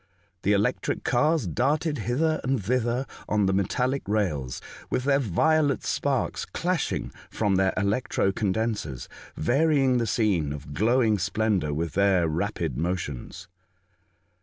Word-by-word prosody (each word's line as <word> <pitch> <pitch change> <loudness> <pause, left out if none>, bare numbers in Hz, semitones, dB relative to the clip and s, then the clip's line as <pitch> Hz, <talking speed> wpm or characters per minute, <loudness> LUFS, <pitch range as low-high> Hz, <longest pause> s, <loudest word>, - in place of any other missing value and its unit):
The 100 - +2
electric 100 +1 0
cars 150 +2 +2
darted 145 - 0
hither 155 +8 0
and 130 -4 0
thither 125 +2 0 0.2
on 105 -1 +2
the 95 - +2
metallic 125 +8 0
rails, 80 -12 -1 0.3
with 125 - -1
their 140 0 +3
violet 145 - +2
sparks 135 -4 -1
flashing 180 -2 -1 0.2
from 105 -3 0
their 95 0 +3
electro 100 -1 +1
condensers, 100 - -2 0.3
varying 135 - +2
the 115 - 0
scene 90 -12 +1
of 75 0 -8
glowing 110 - +2
splendour 100 -4 0
with 80 +3 -2
their 95 -3 +3
rapid 75 -5 -2
motions. 85 0 -4
110 Hz, 125 wpm, -26 LUFS, 95-130 Hz, 0.3 s, their